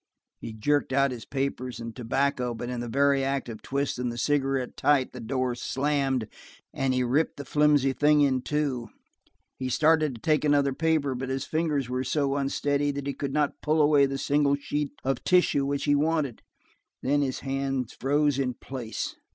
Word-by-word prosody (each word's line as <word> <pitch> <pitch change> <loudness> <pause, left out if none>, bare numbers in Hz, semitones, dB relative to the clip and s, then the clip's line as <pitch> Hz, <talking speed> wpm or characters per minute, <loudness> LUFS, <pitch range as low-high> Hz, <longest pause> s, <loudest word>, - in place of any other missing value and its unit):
He - - -7
jerked 140 +6 0
out 140 0 +3
his 120 -3 -7
papers 135 -3 -3
and 115 -1 -7
tobacco, 125 0 -1
but 120 +2 -5
in 125 - -3
the 120 - -4
very 140 +2 +2
act 135 -1 -1
of 110 -2 -8
twisting 135 -3 -2
the 120 - -6
cigarette 135 -1 0
tight 140 -2 +2
the 125 - -8
door 130 +1 -1
slammed 135 -2 -1 0.5
and 135 -1 0
he 125 0 +1
ripped 135 +6 +1
the 140 - -7
flimsy 145 -1 +3
thing 150 +2 +4
in 130 -3 +2
two. 140 -5 -2 0.7
He 130 -1 -2
started 155 0 +3
to 115 - -12
take 155 -1 +2
another 145 -2 +3
paper, 155 -2 +1
but 130 +1 -4
his 135 0 -2
fingers 155 -5 -1
were 125 +1 -2
so 140 +1 0
unsteady 145 +1 0
that 140 -1 -3
he 140 - -2
could 140 -1 -4
not 145 0 0
pull 155 +1 +1
away 145 -2 +5
the 135 0 -3
single 140 +1 +2
sheet 145 +1 -3
of 135 -1 -1
tissue 175 -6 +3
which 140 0 -1
he 145 - +3
wanted. 150 -3 0 0.6
Then 145 +2 +2
his 130 -2 -2
hands 135 -2 -2
froze 145 +1 +1
in 125 -2 -1
place. 125 -4 -5
140 Hz, 185 wpm, -27 LUFS, 130-145 Hz, 0.7 s, away